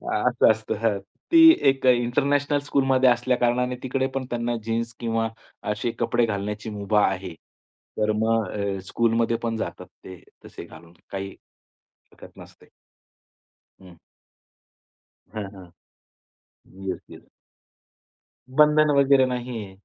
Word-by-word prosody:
असं -, -, +3 dB
असतं 110 Hz, 0 st, -3 dB
हं. 110 Hz, -3 st, +1 dB, 0.3 s
ती 330 Hz, -, +6 dB, 0.3 s
एक 135 Hz, -1 st, -1 dB
इंटरनॅशनल 140 Hz, +4 st, +2 dB
स्कूलमध्ये 135 Hz, -2 st, +3 dB
असल्या 125 Hz, +1 st, +1 dB
कारणाने 125 Hz, +1 st, 0 dB
तिकडे 130 Hz, +1 st, -1 dB
पण 130 Hz, -1 st, -2 dB
त्यांना 120 Hz, 0 st, -2 dB
जीन्स 115 Hz, +1 st, -2 dB
किंवा 115 Hz, -1 st, -1 dB, 0.4 s
असे 115 Hz, +3 st, -3 dB
कपडे 120 Hz, -1 st, +1 dB
घालण्याची 105 Hz, +1 st, -4 dB
मुभा 105 Hz, 0 st, +1 dB
आहे. 95 Hz, -2 st, -4 dB, 0.6 s
तर 110 Hz, 0 st, +1 dB
मग 110 Hz, -1 st, +1 dB
अ, 100 Hz, -2 st, -3 dB
स्कूलमध्ये 115 Hz, 0 st, +1 dB
पण 115 Hz, -1 st, -2 dB
जातात -, -, -5 dB, 0.2 s
ते 95 Hz, -2 st, -11 dB, 0.2 s
तसे -, -, -10 dB
घालून. 85 Hz, 0 st, -15 dB, 0.2 s
काही 95 Hz, 0 st, -5 dB, 0.8 s
हरकत -, -, -16 dB
नसते. -, -, -15 dB, 1.1 s
हं. 90 Hz, -2 st, -15 dB, 1.3 s
हां, 105 Hz, -2 st, -5 dB
हां. 95 Hz, -2 st, -12 dB, 1.2 s
Yes, 95 Hz, -, -3 dB
yes. -, -, -14 dB, 1.3 s
बंधन 150 Hz, 0 st, +5 dB
वगैरे 135 Hz, -1 st, +5 dB
नाही 125 Hz, -3 st, -4 dB
आहे 95 Hz, -1 st, -13 dB
115 Hz, 120 wpm, -24 LUFS, 105-125 Hz, 1.3 s, ती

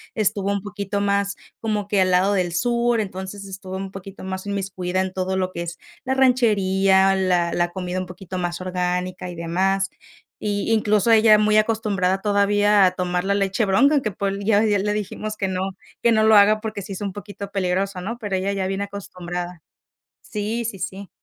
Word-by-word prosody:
estuvo 200 Hz, -2 st, 0 dB
un 200 Hz, -, -2 dB
poquito 205 Hz, 0 st, -3 dB
más 200 Hz, 0 st, +1 dB, 0.2 s
como 210 Hz, -2 st, -2 dB
que 205 Hz, -2 st, +2 dB
al 185 Hz, -1 st, +3 dB
lado 185 Hz, +3 st, +3 dB
del 180 Hz, -3 st, 0 dB
sur, 235 Hz, +4 st, +1 dB
entonces, 190 Hz, 0 st, -6 dB
estuvo 190 Hz, -1 st, -7 dB
un 190 Hz, 0 st, -5 dB
poquito 195 Hz, 0 st, -10 dB
más 190 Hz, 0 st, -5 dB
inmiscuida 185 Hz, -2 st, -2 dB
en 190 Hz, 0 st, -2 dB
todo 190 Hz, 0 st, -2 dB
lo 185 Hz, -1 st, -1 dB
que 170 Hz, -, -5 dB
es 170 Hz, 0 st, -6 dB, 0.3 s
la 260 Hz, -, +1 dB
ranchería, 195 Hz, -7 st, +3 dB
la 180 Hz, -3 st, +1 dB
la 175 Hz, 0 st, +1 dB
comida 180 Hz, 0 st, -3 dB
un 185 Hz, -, -3 dB
poquito 185 Hz, +1 st, -8 dB
más 175 Hz, 0 st, -3 dB
orgánica, 180 Hz, 0 st, -2 dB
y 175 Hz, -, -7 dB
demás. 190 Hz, +4 st, 0 dB, 0.6 s
Y, 205 Hz, +2 st, 0 dB
incluso, 215 Hz, 0 st, +2 dB
ella 220 Hz, -1 st, +7 dB
muy 210 Hz, 0 st, +3 dB
acostumbrada 210 Hz, -4 st, +1 dB
todavía 205 Hz, 0 st, +4 dB
a 185 Hz, -, +4 dB
tomar 180 Hz, -1 st, -1 dB
la 200 Hz, +1 st, +1 dB
leche 195 Hz, +2 st, +1 dB
bronca, 245 Hz, +10 st, +4 dB
aunque, 245 Hz, -7 st, 0 dB
pues, 195 Hz, +1 st, -2 dB
ya 205 Hz, 0 st, +4 dB
hoy 220 Hz, -, +2 dB
día 205 Hz, -2 st, +2 dB
le 210 Hz, +2 st, 0 dB
dijimos 210 Hz, +1 st, -4 dB
que 195 Hz, -, -1 dB
no 185 Hz, 0 st, -2 dB, 0.4 s
que 235 Hz, -, +4 dB
no 220 Hz, -1 st, +4 dB
lo 220 Hz, 0 st, +6 dB
haga 210 Hz, +1 st, +6 dB
porque 215 Hz, -2 st, -5 dB
sí 195 Hz, -, -9 dB
es 190 Hz, -, -7 dB
un 200 Hz, -2 st, -3 dB
poquito 205 Hz, 0 st, -8 dB
peligroso, 190 Hz, 0 st, -1 dB
¿no? 225 Hz, +6 st, -4 dB
Pero 205 Hz, -4 st, -2 dB
ella 190 Hz, +1 st, -1 dB
ya 195 Hz, -1 st, -1 dB
viene 195 Hz, +1 st, -2 dB
acostumbrada. 180 Hz, -3 st, -6 dB, 0.6 s
Sí, 215 Hz, +3 st, -3 dB
sí, 210 Hz, -3 st, -5 dB
sí. 195 Hz, +1 st, -6 dB
195 Hz, 200 wpm, -22 LUFS, 185-210 Hz, 0.6 s, ella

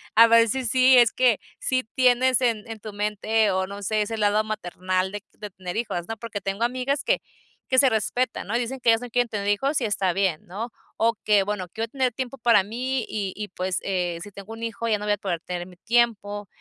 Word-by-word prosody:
a 230 Hz, -, +9 dB
ver 230 Hz, 0 st, +6 dB
sí 260 Hz, +3 st, -1 dB
sí 255 Hz, +2 st, +5 dB
es 235 Hz, -2 st, +6 dB
que 250 Hz, -4 st, +3 dB, 0.2 s
sí 255 Hz, -1 st, 0 dB
tienes 255 Hz, 0 st, +4 dB
en 230 Hz, -3 st, 0 dB
en 220 Hz, -1 st, -6 dB
tu 215 Hz, 0 st, -8 dB
mente 210 Hz, +1 st, +1 dB
o 190 Hz, 0 st, 0 dB
no 200 Hz, +1 st, -8 dB
sé, 215 Hz, +2 st, +1 dB
ese 225 Hz, +2 st, -2 dB
lado 210 Hz, 0 st, +2 dB
maternal 185 Hz, -2 st, -2 dB
de 205 Hz, 0 st, -6 dB
de 210 Hz, -, -8 dB
tener 180 Hz, +1 st, -6 dB
hijos, 175 Hz, -7 st, -3 dB
¿no?, 225 Hz, 0 st, -5 dB
porque 215 Hz, -3 st, -6 dB
tengo 195 Hz, +4 st, -2 dB
amigas 255 Hz, +3 st, 0 dB
que -, -, +1 dB, 0.5 s
que 260 Hz, -, +2 dB
se 270 Hz, -, +6 dB
respeta, 230 Hz, +2 st, -1 dB
¿no?, 210 Hz, -, -3 dB
y 240 Hz, -, +2 dB
dicen 255 Hz, +2 st, -3 dB
que 240 Hz, -, +2 dB
ellas 225 Hz, +1 st, +4 dB
no 245 Hz, -, -7 dB
quieren 245 Hz, +1 st, +2 dB
tener 205 Hz, -1 st, -3 dB
hijos 270 Hz, +9 st, +1 dB
y -, -, 0 dB
está 195 Hz, -3 st, +1 dB
bien, 190 Hz, -4 st, 0 dB
¿no?, 220 Hz, +7 st, -5 dB, 0.3 s
o 230 Hz, +1 st, +3 dB
que, 205 Hz, -2 st, +4 dB
bueno, 195 Hz, -2 st, -3 dB
quiero 225 Hz, +5 st, -4 dB
tener 260 Hz, -2 st, +1 dB
tiempo 260 Hz, +1 st, -5 dB
para 230 Hz, -4 st, +5 dB
mí 250 Hz, +3 st, -2 dB
y 200 Hz, -3 st, -3 dB
y, 210 Hz, -1 st, -5 dB
pues, 185 Hz, 0 st, -2 dB
eh 180 Hz, -3 st, -1 dB
si 205 Hz, -, -10 dB
tengo 200 Hz, +3 st, -10 dB
un 225 Hz, +1 st, -8 dB
hijo, 230 Hz, 0 st, -3 dB
ya 215 Hz, -2 st, +2 dB
no 210 Hz, -, -6 dB
voy 210 Hz, -, +1 dB
a -, -, -1 dB
poder 180 Hz, -4 st, -3 dB
tener 180 Hz, -1 st, -5 dB
mi 180 Hz, -, -15 dB
tiempo. 205 Hz, -2 st, 0 dB
215 Hz, 240 wpm, -24 LUFS, 200-240 Hz, 0.5 s, a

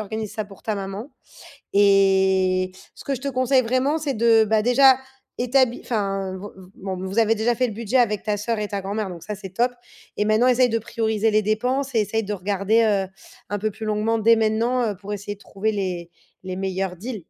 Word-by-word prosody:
organises 215 Hz, 0 st, -5 dB
ça 215 Hz, -, -3 dB
pour 195 Hz, -1 st, -15 dB
ta 215 Hz, -, -2 dB
maman. 200 Hz, +7 st, -6 dB, 0.6 s
Et, 190 Hz, -2 st, +3 dB, 0.2 s
ce -, -, -12 dB
que 275 Hz, -, -2 dB
je 255 Hz, -, -9 dB
te 280 Hz, -, -3 dB
conseille 255 Hz, 0 st, +2 dB
vraiment, 255 Hz, +6 st, 0 dB
c'est 285 Hz, -4 st, -2 dB
de 225 Hz, -1 st, +4 dB
bah, 215 Hz, 0 st, +2 dB
déjà, 260 Hz, +2 st, +6 dB, 0.4 s
établi 250 Hz, 0 st, +2 dB
enfin, 195 Hz, -4 st, -2 dB
v 190 Hz, +2 st, -7 dB, 0.3 s
bon, 190 Hz, -1 st, -5 dB
vous 190 Hz, +4 st, -2 dB
avez 225 Hz, 0 st, +3 dB
déjà 230 Hz, +3 st, +1 dB
fait 250 Hz, +2 st, 0 dB
le 220 Hz, -, -6 dB
budget 230 Hz, +3 st, -1 dB
avec 215 Hz, -5 st, +2 dB
ta 210 Hz, -1 st, -1 dB
soeur 225 Hz, +2 st, -2 dB
et 210 Hz, -, -2 dB
ta 200 Hz, -2 st, -3 dB
grand-mère, 200 Hz, +1 st, -3 dB
donc 170 Hz, -2 st, -9 dB
ça 210 Hz, -, -5 dB
c'est 190 Hz, -1 st, -9 dB
top. 240 Hz, +5 st, +1 dB, 0.5 s
Et 210 Hz, -, +1 dB
maintenant, 215 Hz, +3 st, +3 dB
essaye 255 Hz, 0 st, +4 dB
de 230 Hz, 0 st, 0 dB
prioriser 220 Hz, -1 st, 0 dB
les 215 Hz, 0 st, +2 dB
dépenses 250 Hz, +6 st, -1 dB
et -, -, +4 dB
essaye 225 Hz, +2 st, -1 dB
de 210 Hz, -, -3 dB
regarder, 200 Hz, +3 st, +1 dB
heu, 200 Hz, -3 st, +1 dB, 0.4 s
un 205 Hz, -1 st, -2 dB
peu 215 Hz, -, 0 dB
plus 220 Hz, -, -8 dB
longuement 215 Hz, +2 st, 0 dB
dès 230 Hz, +1 st, +5 dB
maintenant, 225 Hz, +3 st, +1 dB
heu, -, -, -7 dB
pour 205 Hz, +2 st, -7 dB
essayer 205 Hz, 0 st, -5 dB
de -, -, -28 dB
trouver 210 Hz, +2 st, -2 dB
les 180 Hz, -4 st, -3 dB, 0.3 s
les 185 Hz, 0 st, -5 dB
meilleurs 190 Hz, -1 st, -2 dB
deals. 215 Hz, +1 st, -6 dB
215 Hz, 220 wpm, -23 LUFS, 195-235 Hz, 0.6 s, déjà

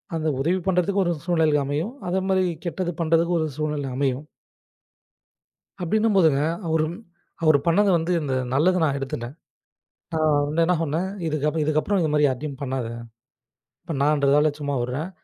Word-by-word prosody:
அந்த 160 Hz, -1 st, -1 dB
உதவி 170 Hz, +7 st, +1 dB
பண்ணுறத்துக்கு 190 Hz, +2 st, +2 dB
ஒரு 175 Hz, -1 st, 0 dB
சூழ்நிலை 160 Hz, -4 st, +2 dB
அமையும், 150 Hz, -, -2 dB, 0.2 s
அத 190 Hz, +2 st, 0 dB
மாரி 190 Hz, -1 st, +3 dB, 0.2 s
கெட்டது 175 Hz, +1 st, -2 dB
பண்றதுக்கும் 165 Hz, +1 st, +2 dB
ஒரு 160 Hz, -, 0 dB
சூழ்நிலை 150 Hz, -2 st, -2 dB
அமையும். 135 Hz, 0 st, -1 dB, 1.6 s
அப்டின்னும்போது, 200 Hz, -2 st, +3 dB, 0.4 s
அவரும் 160 Hz, +1 st, 0 dB, 0.5 s
அவர் 155 Hz, -2 st, +6 dB
பண்ணது 200 Hz, +5 st, +4 dB
வந்து 165 Hz, +2 st, -2 dB
இந்த 140 Hz, -3 st, -2 dB, 0.2 s
நல்லத 180 Hz, +7 st, +3 dB
நான் 140 Hz, -3 st, +1 dB
எடுத்துட்டேன். 130 Hz, -1 st, -5 dB, 0.8 s
நான் 155 Hz, -1 st, +2 dB, 0.2 s
வந்து 160 Hz, +3 st, +1 dB
என்ன 180 Hz, +2 st, +2 dB
சொன்னேன் 165 Hz, +4 st, -1 dB, 0.2 s
"இதுக்கப் 150 Hz, 0 st, -1 dB
இதுக்கப்புறம் 155 Hz, +7 st, +1 dB
இது 160 Hz, -, +1 dB
மாரி 150 Hz, 0 st, +3 dB
யார்டியும் 135 Hz, +1 st, -3 dB
பண்ணாத, 130 Hz, -3 st, -2 dB, 1.0 s
இப்ப 165 Hz, -, -6 dB
நான்றதால 145 Hz, 0 st, +3 dB
சும்மா 145 Hz, -1 st, -2 dB
உடுறேன். 135 Hz, +8 st, -3 dB
155 Hz, 140 wpm, -24 LUFS, 145-175 Hz, 1.6 s, அவர்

